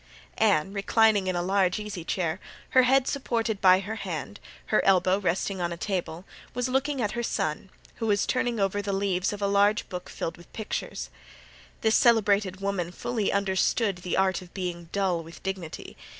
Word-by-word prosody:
Anne, 195 -4 +3
reclining 210 0 +3
in 185 - 0
a 175 - 0
large 190 0 +2
easy 210 -5 -6
chair, 170 0 -1 0.3
her 260 - +6
head 265 +1 +3
supported 230 -6 -1
by 185 -1 +7
her 215 +3 -5
hand, - - -5 0.3
her - - +4
elbow 185 0 +4
resting 190 0 -1
on 175 0 -1
a 170 - -4
table, 180 -2 -3 0.3
was 250 0 0
looking 270 +2 0
at 205 - 0
her 235 - -2
son, 155 -5 -2 0.3
who 225 - -2
was 205 -1 +2
turning 245 -3 0
over 195 +1 +1
the 200 -1 -3
leaves 195 -1 0
of 205 -1 -5
a - - +3
large 200 +1 +3
book 180 -2 -6
filled 165 - -4
with 175 - -17
pictures. 220 - -4 0.7
This 220 0 +3
celebrated 205 -5 +3
woman 195 -3 -2
fully 220 +3 -2
understood 200 +1 +1
the 180 0 -3
art 190 -1 +2
of 180 -1 -15
being 175 -3 -4
dull 190 -4 0
with 165 +1 -13
dignity. 190 -4 -5
195 Hz, 180 wpm, -27 LUFS, 180-215 Hz, 0.7 s, by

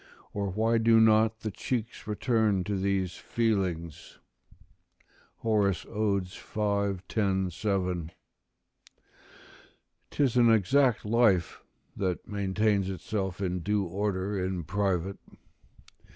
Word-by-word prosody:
or 100 -1 -2
why 110 +4 +1
do 115 0 +5
not 110 0 +4
the 110 - -3
cheeks 115 +2 -4
return 110 -3 +1
to 100 +2 -2
these 95 -2 -1
feelings?" 95 -9 -2 1.2
Horace, 105 -6 0
Od., 100 -2 0
v. 100 0 -2
10, 95 -4 0
7.] 90 -3 -2 2.0
'Tis 130 -4 +1
an 120 -1 +6
exact 115 +4 +3
life 105 -6 +2 0.3
that 90 -3 -2
maintains 100 -1 0
itself 95 0 -3
in 90 -1 -1
due 105 +3 0
order 95 +1 -2
in 90 -2 -2
private. 95 +1 -1
100 Hz, 100 wpm, -28 LUFS, 95-110 Hz, 2.0 s, an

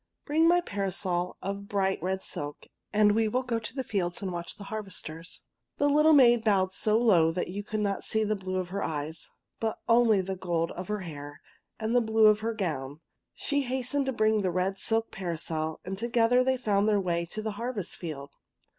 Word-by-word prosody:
'' - - -54
Bring 320 +3 +3
my 350 +1 +5
parasol 190 - -2
of 200 +1 -4
bright 195 -3 0
red 190 +2 -2
silk, 145 0 -6 0.3
and 210 0 +5
we 220 +1 +2
will 250 +4 0
go 235 -2 -1
to 225 +2 -7
the 265 - -2
fields 180 -7 -2
and 195 -3 -3
watch 170 -1 -5
the 205 - -10
harvesters." 190 -6 -6 0.3
The 285 - +3
little 300 +2 +5
maid 240 -5 +6
bowed 190 -4 +2
so 215 +2 +2
low 180 -9 +4
that 180 - -2
you 200 +3 -4
could 215 +1 -3
not 200 -1 -1
see 220 0 +1
the 215 0 0
blue 185 -1 -5
of 185 -1 -2
her 200 +2 -3
eyes, 155 +1 -4 0.3
but 225 -1 -1
only 230 -3 +5
the 190 +1 -4
gold 170 -2 -1
of 180 +1 -6
her 210 -1 -2
hair 145 -4 -8 0.4
and 220 +2 -1
the 245 - +5
blue 220 -1 +3
of 215 0 +6
her 225 +1 -2
gown. 150 -7 -3 0.3
She 285 -1 0
hastened 265 +2 -1
to - - +1
bring 215 -2 +2
the 190 - 0
red 185 +2 -1
silk 225 0 0
parasol, 160 -4 -3
and 190 +1 -4
together 235 +2 +3
they 260 0 +1
found 210 -3 +1
their 205 -1 +3
way 170 -2 -1
to 215 +5 -5
the 220 - -2
harvest 215 -3 -4
field. 145 -5 -7
205 Hz, 210 wpm, -28 LUFS, 180-225 Hz, 0.4 s, maid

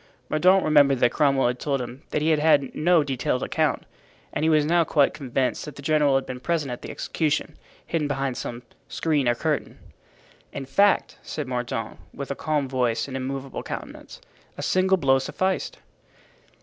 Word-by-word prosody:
Mordaunt 185 +5 +4
remembered 145 -3 +5
that 120 - +4
Cromwell 135 -2 +2
had 125 +1 0
told 140 -2 -1
him 125 +2 -7
he 150 +2 +1
had 155 - +3
had 150 -3 +3
no 170 0 +3
detailed 130 -2 -1
account, - - 0 0.5
and - - -2
he 160 - +3
was 155 -2 +4
now 170 +2 +3
quite 145 -3 +2
convinced 130 -2 -2
that 150 -3 -9
the 140 - -11
general 150 -2 +3
had 135 - +1
been 125 0 -6
present 155 -2 -1
at 125 - -6
the - - -8
execution, 155 -2 -2 0.3
hidden 160 -3 -1
behind 135 -3 -2
some 120 0 -6 0.2
screen 150 -5 0
or 120 - +2
curtain. - - -2 0.7
"In 135 - -6
fact," 200 +10 +2
said 150 - -5
Mordaunt, 120 -5 -4 0.2
with 140 -1 -5
a - - -2
calm 150 -2 -1
voice 125 -3 0
and 135 - -7
immovable 135 +1 -4
countenance, - - -8 0.4
"a - - -5
single 190 +1 +3
blow 135 -5 +3
sufficed." 185 +7 -2
140 Hz, 175 wpm, -24 LUFS, 130-155 Hz, 0.7 s, remembered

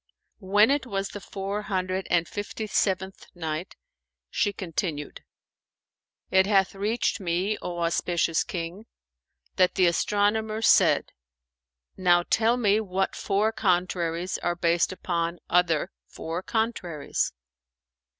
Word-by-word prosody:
When 205 +4 +4
it 280 -2 0
was 195 -3 -2
the 205 - -7
Four 195 +2 -4
Hundred 185 -2 -2
and 170 -1 +2
Fifty 210 +1 -5
seventh 190 -2 -1
Night, 160 0 -4 0.6
She 205 - +1
continued, 165 -5 -4 1.1
It 190 0 +4
hath 195 -2 +3
reached 215 +4 -1
me, 185 +3 0
O 175 -1 -4
auspicious 170 0 +1
King, 180 +5 -6 0.7
that 185 -1 +3
the 185 - +4
astronomer 210 +5 +1
said, - - +4 0.9
"Now 175 -2 +4
tell 230 +2 +3
me 210 -3 +3
what 190 -2 -1
four 205 +2 +1
contraries 180 -4 0
are 175 0 -1
based 170 0 +2
upon 170 -2 -2
other 170 -3 +2 0.2
four 165 +2 -5
contraries?" 190 -9 -2
190 Hz, 115 wpm, -26 LUFS, 175-205 Hz, 1.1 s, When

